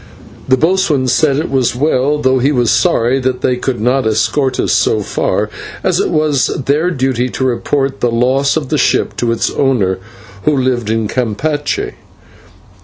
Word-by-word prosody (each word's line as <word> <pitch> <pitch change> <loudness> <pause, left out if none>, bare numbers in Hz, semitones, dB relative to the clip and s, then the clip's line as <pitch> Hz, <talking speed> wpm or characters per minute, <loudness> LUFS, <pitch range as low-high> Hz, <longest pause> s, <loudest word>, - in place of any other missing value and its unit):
The 130 - +3
boatswain 160 -5 +1
said 140 +2 +2
it 155 0 -2
was 130 -3 +1
well, 145 +1 +1
though 130 -2 +2
he 135 +4 +2
was 120 -5 +2
sorry 120 +4 +2
that 130 -1 -2
they 125 - +1
could 125 -1 -3
not 125 +2 +1
escort 125 +5 0
us - - 0
so - - +2
far, - - -1 0.4
as - - +1
it - - 0
was 150 -5 +1 0.2
their 150 +5 +1
duty 130 -5 -1
to 130 - -4
report 135 +2 -1
the 120 - +1
loss 130 +5 +1
of 145 -5 -4
the 150 - 0
ship - - +1
to 120 -1 0
its 115 - -1
owner, 105 -9 0 0.5
who 150 -2 +2
lived 125 -4 0
at 110 -1 0
Campeche. 145 - -2
130 Hz, 175 wpm, -14 LUFS, 120-145 Hz, 0.5 s, The